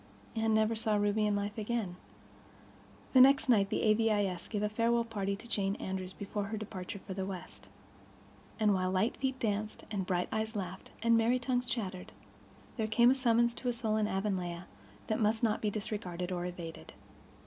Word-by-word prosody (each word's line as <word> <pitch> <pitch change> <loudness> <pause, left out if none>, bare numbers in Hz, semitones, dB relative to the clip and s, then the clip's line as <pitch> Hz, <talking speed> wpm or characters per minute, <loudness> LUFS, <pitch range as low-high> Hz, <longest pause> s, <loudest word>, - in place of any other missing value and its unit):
Anne 220 -1 +2
never 220 +1 +3
saw 220 -1 0
Ruby 205 +1 +2
in 205 - +1
life 205 +2 -2
again. 215 -4 -2 1.2
The 260 - +8
next 275 +1 +6
night 200 -5 +5
the - - 0
A.V.I.S. 210 -5 +2
gave 210 -2 -2
a - - +3
farewell 230 +2 +2
party 200 -3 -2
to 210 - -12
Jane 200 -3 0
Andrews 190 -2 -4
before 200 +1 -4
her 215 +2 -4
departure 200 -2 -6
for 195 0 -7
the 190 0 -3
West. 190 -2 -7 0.9
And, 210 -2 +4
while 185 -1 +1
light 190 +5 +1
feet 265 -1 -1
danced 215 -2 -2
and 195 -3 -2
bright 180 -1 0
eyes 220 +1 -2
laughed 190 -2 -5
and 230 0 +5
merry 230 +2 +3
tongues 250 0 -1
chattered, 195 -7 -4 0.6
there 220 -2 0
came 235 +3 +5
a - - +6
summons 235 -2 +3
to 250 - -6
a - - +1
soul 225 -2 -1
in 215 -1 +2
Avonlea 185 -3 -2 0.4
that 215 - -1
might 220 +2 +2
not 220 -2 +2
be 215 - +1
disregarded 190 -4 -4
or 175 -1 -2
evaded. 165 - -8
210 Hz, 185 wpm, -32 LUFS, 190-230 Hz, 1.2 s, The